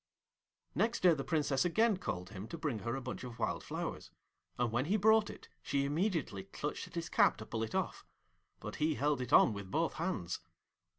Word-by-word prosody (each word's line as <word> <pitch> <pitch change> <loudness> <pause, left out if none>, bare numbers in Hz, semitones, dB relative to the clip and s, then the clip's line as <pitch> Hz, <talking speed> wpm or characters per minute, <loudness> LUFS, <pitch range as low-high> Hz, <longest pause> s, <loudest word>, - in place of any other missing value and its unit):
Next 230 +1 +1
day 180 -2 +7
the 140 -3 -2
Princess 145 -4 +1
again 215 +4 +3
called 90 - -4
him 100 0 -7
to 170 - -6
bring 150 -8 -2
her 115 +3 -2
a 135 - -4
bunch 125 +1 -5
of 120 -2 -7
wild 115 - -1
flowers, - - -4 0.5
and 120 -2 +1
when 120 +3 +1
he 200 +7 +2
brought 220 +1 +5
it - - -10
she 140 -1 0
immediately 150 - -1
clutched 145 +9 -4
at - - -14
his 170 -1 -2
cap - - +4
to 110 - -8
pull 110 0 -3
it 110 0 -3
off; - - -1 0.6
but - - -6
he 155 0 +1
held 145 0 +1
it 125 - -4
on - - +7
with 100 -2 -7
both 160 - 0
hands. 110 - -2
140 Hz, 210 wpm, -34 LUFS, 115-170 Hz, 0.6 s, day